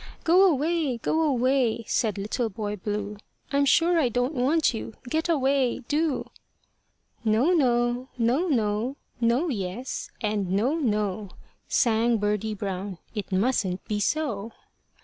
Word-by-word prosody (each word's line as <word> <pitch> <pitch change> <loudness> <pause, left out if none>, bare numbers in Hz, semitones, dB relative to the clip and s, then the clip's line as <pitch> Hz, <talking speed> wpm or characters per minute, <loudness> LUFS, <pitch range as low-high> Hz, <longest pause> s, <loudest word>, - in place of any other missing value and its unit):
"Go 365 +3 +6
away! 305 -2 0
go 315 +8 0
away!" 255 -5 +2
said 215 -2 0
Little 215 +4 -2
Boy 210 0 -4
Blue; 205 +1 -4 0.3
"I'm 280 0 +3
sure 335 +4 +4
I 265 -6 +2
don't 245 +5 0
want 285 +3 +2
you 220 -1 -6
get 320 +6 -1
away 270 -5 +2
do." 305 -1 -1 0.9
"No, 225 +9 +3
no; 245 -4 +1
no, 250 +9 +2
no; 230 -1 0 0.2
no, 240 +8 +2
yes, 210 +1 -4
and 210 -3 -1
no, 225 +9 +2
no," 210 - -1 0.4
Sang 230 0 +2
Birdie 210 +1 -1
Brown, 195 -1 -4 0.2
"it 210 -2 -5
mustn't 190 -2 0
be 210 -1 -2
so. 225 -3 -1
240 Hz, 130 wpm, -26 LUFS, 210-280 Hz, 0.9 s, Go